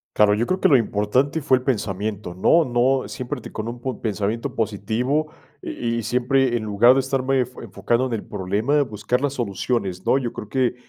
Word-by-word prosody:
Claro, 105 -1 +5
yo 110 +3 +1
creo 185 +6 -1
que - - +4
lo 150 - +5
importante 125 +6 +1
fue 135 -2 +3
el - - -13
pensamiento, 105 -5 -2
no 165 - +4
no 130 +2 +1
siempre 130 +2 -5
te - - -9
con 110 +1 -4
un 120 +2 -5
pensamiento 110 +1 -2
positivo 115 +8 -1 0.3
y 115 -1 -3
y 115 - -4
siempre 125 +2 +1
en 110 - -4
lugar 110 +4 +5
de - - +3
estarme 135 -1 +1
fo 125 +1 -13
enfocando 120 +2 -1
en 125 - -4
el 110 - -3
problema, 105 +9 0
buscar 115 +2 -2
las 145 -2 0
soluciones, 100 -4 -2
¿no? - - +4
Yo 125 -4 -3
creo 105 -3 -8
que 130 -1 +1
120 Hz, 200 wpm, -22 LUFS, 105-130 Hz, 0.3 s, Claro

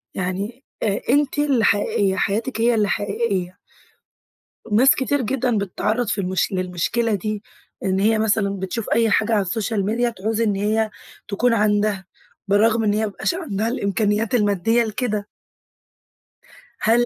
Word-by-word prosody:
يعني 195 +8 -4 0.2
أ 200 -2 +1
أنتِ 285 +1 +2
اللي 275 -6 +2
حقيقية، 200 -1 +2
حياتكِ 225 +5 -1
هي 235 0 +3
اللي 210 -2 +2
حقيقية. 200 -3 -2 1.1
ناس 255 +6 +6
كتير 275 +1 0
جدًا 245 -1 0
بتتعرّض 215 +4 -1
في 205 -1 0
المش 185 +2 0
للمشكلة 185 +5 -1
دي، 215 +1 -4 0.4
إن 190 0 +1
هي 215 +2 +3
مثلًا 215 -2 +2
بتشوف 190 +4 -4
أي 225 -1 +3
حاجة 220 +2 +2
على 210 - +3
السوشيال 205 +1 -1
ميديا 235 +3 +1
تعوز 220 +1 -2
إن 210 -3 +1
هي 215 +2 0 0.4
تكُون 230 +4 +1
عَندها 210 -2 +1 0.4
بالرغم 220 +3 +3
إن 205 -1 +2
هي 210 - 0
ما 220 - +1
بيبقاش 210 - -2
عَندها 225 - -2
الإمكانيات 210 0 0
المادّية 210 +2 +2
لكده. 215 -2 -2 1.5
هل 235 +2 +3
215 Hz, 145 wpm, -21 LUFS, 200-230 Hz, 1.5 s, ناس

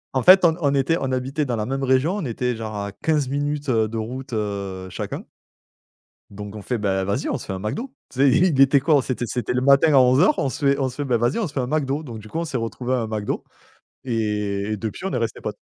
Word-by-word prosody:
En 130 - +2
fait, 185 +2 +8
on 160 -1 +4
on 140 -2 +2
était 140 +4 +2
on 135 - -1
habitait 130 +4 -1
dans 125 -4 -1
la 105 -1 -2
même 135 +1 -2
région. 135 +9 +2
On 190 - -3
était 125 0 -2
genre 110 -1 -6
à 100 -1 -4
15 145 +4 0
minutes, 145 0 -2
heu, 110 -3 +2
de 115 - -5
route, 125 +5 -5
heu, 100 -3 -3
chacun. - - -5 1.0
Donc 105 +1 -9
on 105 - -7
fait: 125 +4 -2
«Bah 95 -2 0
vas-y, 100 +8 -1
on - - -1
se - - -10
fait 95 - -4
un - - -4
McDo», 235 - -4 0.2
tu 130 - -13
sais? 140 - +6
Il 160 -4 +3
était 135 0 +6
quoi? 150 +1 +3
On - - +4
c'était 125 -2 -3
c'était 120 -2 -2
le 125 - +1
matin 140 +3 +5
à - - +7
11:00. 130 - +4
On 135 - 0
se 145 +1 -3
fait 140 0 +3
on 130 -2 0
se 130 - -13
fait: 145 - -2
«Bah 125 -2 +2
vas-y, 120 - +1
on 215 - 0
se 145 - -14
fait 135 - 0
un 125 - -1
McDo». 145 +1 -1
Donc 120 -6 -8
du 110 - -11
coup, 160 - -4
on - - -2
s'est 150 -6 -4
retrouvé 120 +2 -3
à 130 - +2
un 115 - -2
McDo 110 -1 -3 0.6
et 105 -3 -1
et 110 - -1
depuis, 110 - -5
on 195 - -2
est - - -1
resté 115 -2 -3
potes. - - -5
130 Hz, 280 wpm, -22 LUFS, 110-140 Hz, 1.0 s, fait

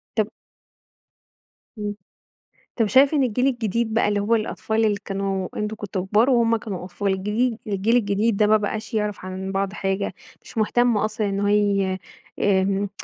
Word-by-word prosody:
طب 215 -1 +1 1.5
امم. 205 0 -3 0.8
طب 225 -3 +2
شايف 270 +8 +5
إن 280 - +3
الجيل 250 +2 +1
الجديد 230 -3 0
بقى 220 - +3
اللي 205 -1 +1
هو 220 +3 +2
الأطفال 220 0 0
اللي 210 -2 +2
كانوا 195 -1 -2
أنتم 210 +1 -2
كنتم 195 -3 -4
كبار، 220 +6 +3
وهم 230 -2 +3
كانوا 200 -5 -6
أطفال، 195 +2 -2
الجديد 215 +5 0
الجيل 210 +4 +1
الجديد 205 0 +1
ده 210 - +4
ما 215 +1 +5
بقاش 220 +2 -3
يعرف 210 -3 -2
عن 190 +1 -5
بعض 195 0 -1
حاجة، 195 -1 -2 0.3
مش 225 - -9
مهتم 240 +1 +3
أصلًا 215 0 0
إن 195 0 -2
هو 205 - +1
ي 200 -2 +2 0.4
آمم 195 0 +2
210 Hz, 165 wpm, -23 LUFS, 195-225 Hz, 1.5 s, شايف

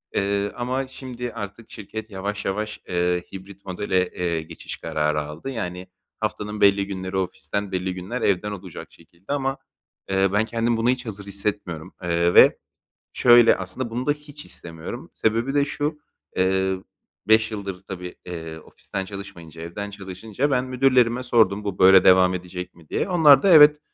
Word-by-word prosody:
eee, 100 +1 0
ama 130 +2 -2
şimdi 125 -2 -7
artık 105 0 -8
şirket 110 +1 -7
yavaş 100 +2 -4
yavaş, 105 +2 -3
eee, 90 0 0
hibrit 100 +1 -11
modele, 95 -1 0
eee, 85 -2 -2
geçiş 80 +1 -8
kararı 75 0 -1
aldı. 75 - -7
Yani, 90 -7 -5 0.3
haftanın 105 0 -3
belli 100 0 +4
günleri 95 -1 -4
ofisten, 100 +2 -3
belli 95 0 -2
günler 95 +7 -5
evden 100 +1 +1
olacak 95 -4 -8
şekilde 90 +10 -9
ama, 135 -1 -1 0.5
eee, 95 0 +2
ben 105 +2 +3
kendimi 115 +1 0
buna 115 +2 +1
hiç 125 0 0
hazır 100 -3 -7
hissetmiyorum, 100 -4 -3
eee, 85 0 +1
ve - - +7 0.6
şöyle, 120 -1 +6
aslında, 95 +6 -4
bunu 120 +3 -3
da 145 - +4
hiç 150 0 -10
istemiyorum. 80 -1 -7
Sebebi 115 +5 0
de 145 -1 +4
şu, 150 +1 -3 0.4
eee, 95 0 +2 0.5
5 110 0 +5
yıldır, 100 -3 -6
tabii, 90 -2 -7
eee, 80 -2 -6
ofisten 95 +4 -7
çalışmayınca 85 -5 -9
evden 100 +5 -6
çalışınca 100 +7 -4
ben 125 -2 +2
müdürlerime 130 -2 +2
sordum, 110 -5 +2
"Bu 100 -2 -4
böyle 95 0 +7
devam 95 0 +6
edecek 90 0 -6
mi?" 80 -2 -19
diye. - - -1
Onlar 150 -6 +6
da, 195 - +3
"Evet, 150 -3 +8
100 Hz, 160 wpm, -23 LUFS, 90-120 Hz, 0.6 s, Evet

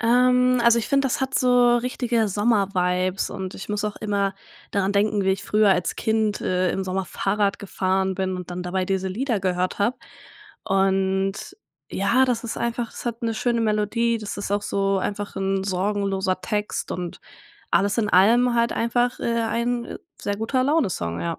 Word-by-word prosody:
Ähm, 250 +1 +4
also, 235 0 +6
ich 225 - -3
finde, 275 -1 +2
das 265 - -1
hat 265 0 -2
so 245 -1 +4
richtige 240 -2 0
Sommer-Vibes 190 -3 +1
und 190 -1 -6
ich 195 - -8
muss 210 0 -2
auch 210 - -3
immer 200 -2 -1 0.4
daran 200 0 +1
denken, 205 0 +1
wie 190 - +3
ich 195 +1 -2
früher 210 0 +3
als 180 -2 0
Kind, 220 -1 0
äh, 185 0 0
im 190 - -2
Sommer 190 +1 -2
Fahrrad 200 +2 -1
gefahren 190 -1 -1
bin 185 0 -2
und 180 -1 -8
dann 180 0 -4
dabei 185 +1 -1
diese 190 0 -1
Lieder 230 +4 -1
gehört 185 -1 -1
habe. 220 +5 +1 0.7
Und, 195 0 +1 0.6
ja, 230 +7 +2
das 245 -3 -1
ist 230 - -4
einfach 235 0 -2
das - - -9
hat 235 0 -3
'ne 225 -1 -1
schöne 235 +1 0
Melodie, 225 +2 +1
das 210 -2 -6
ist 200 -1 -5
auch 205 0 0
so 195 -1 0
einfach 205 +1 -4
'n 195 0 0
sorgenloser 195 -1 -1
Text 210 -1 -3
und 180 -2 -5 0.5
alles 200 +3 +2
in 215 -2 +1
allem 235 +6 +5
halt 235 0 +2
einfach, 240 +1 0
äh, 230 0 0
ein 235 +2 -2 0.2
Sehr-Guter-Laune-Song, 225 - 0
ja. 165 -1 -3
205 Hz, 175 wpm, -23 LUFS, 190-235 Hz, 0.7 s, also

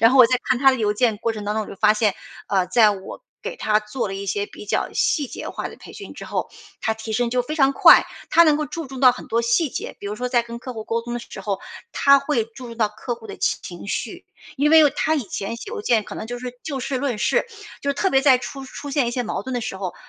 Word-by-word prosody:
然 230 - +8
后 265 - +3
我 245 - +10
在 255 0 +1
看 250 - +1
他 270 0 +6
的 260 - 0
邮 210 -3 +1
件 225 -1 +1
过 230 +2 -1
程 210 -2 -7
当 210 - -1
中， 220 -1 -1
我 - - -12
就 - - -8
发 210 +1 +4
现， 210 -2 +1 0.3
呃， 190 -3 +1
在 215 +3 +5
我 195 - -7 0.2
给 - - -5
他 215 - +2
做 210 +3 -4
了 195 - -5
一 200 +1 -5
些 205 +1 -1
比 205 - -12
较 - - -1
细 290 -3 +1
节 - - -7
化 - - -4
的 - - -12
培 - - -13
训 - - -9
之 - - -9
后， - - -3 0.3
他 220 - +1
提 220 0 -6
升 240 0 +1
就 250 0 +1
非 305 +6 -4
常 275 -2 +4
快， - - +7 0.2
他 335 - +6
能 305 -3 +4
够 305 - -1
注 330 -4 -6
重 265 -1 -8
到 255 -2 +7
很 250 - -10
多 230 +1 +1
细 235 +5 +1
节。 - - -6
比 200 - -8
如 205 - -3
说 250 +3 -3
在 240 -2 +2
跟 235 0 -8
客 255 0 -8
户 220 -1 -6
沟 230 +1 -1
通 240 +1 -6
的 240 - -3
时 195 - -10
候， 195 -1 -2 0.3
他 280 0 +5
会 270 -6 0
注 230 +3 -11
重 230 -1 -9
到 215 -3 +1
客 235 +3 -5
户 225 -1 -13
的 - - -9
情 175 +2 -3
绪。 - - -4 0.3
因 295 +3 +2
为 320 -1 +9
哦， 290 - +5
他 315 - +1
以 290 - 0
前 205 +1 -4
写 395 - -9
邮 460 -3 -4
件 230 - +3
可 - - -9
能 220 - -5
就 245 +1 -5
是 250 0 -7
就 275 -4 -3
事 260 +1 -2
论 260 -4 -1
事， 210 - +1 0.3
就 280 0 0
特 385 +6 0
别 270 - +4
在 265 -2 +5
出 270 +1 -7
出 285 +2 -8
现 270 -3 +1
一 - - -1
些 250 - -1
矛 225 - -3
盾 260 -1 -5
的 245 - -1
时 205 -4 -4
候， 190 -2 -5
240 Hz, 315 characters per minute, -22 LUFS, 215-270 Hz, 0.3 s, 我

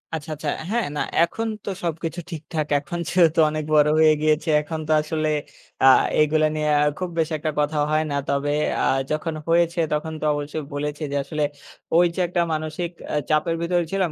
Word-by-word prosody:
আচ্ছা, 160 0 -6
আচ্ছা। 150 0 -4 0.2
হ্যাঁ, 230 +1 0
না - - -1 0.2
এখন 225 +6 -2 0.2
তো - - -3
সবকিছু 165 +1 -3
ঠিকঠাক। 155 -1 -4
এখন 170 +4 -6
যেহেতু 170 -2 +3
অনেক 155 0 -3
বড় 150 -1 +6
হয়ে 155 -1 +6
গিয়েছি। 155 +1 +1
এখন 160 +1 -5
তো - - -1
আসলে 155 0 -2 0.6
আ - - +7 0.3
এগুলা 155 +1 +3
নিয়ে 150 0 0
আ - - +4 0.2
খুব 185 -1 -2
বেশি 160 0 0
একটা 155 +1 -2
কথা 150 +1 0
হয় 155 +1 +2
না। - - -1
তবে 140 +1 0 0.3
আ - - +2 0.3
যখন 155 +2 -1
হয়েছে 170 +1 +2
তখন 160 +1 -2
তো - - -2
অবশ্যই 145 +1 -4
বলেছে, 150 +1 -3
যে - - -2
আসলে 150 +2 -2 0.5
ওই 175 - +6
যে - - -4
একটা 175 0 0
মানসিক 155 +2 -3 0.2
আ - - 0
চাপের 155 +2 +2
ভিতরে 175 +1 +1
ছিলাম, 190 -4 0
155 Hz, 190 wpm, -23 LUFS, 150-170 Hz, 0.6 s, আ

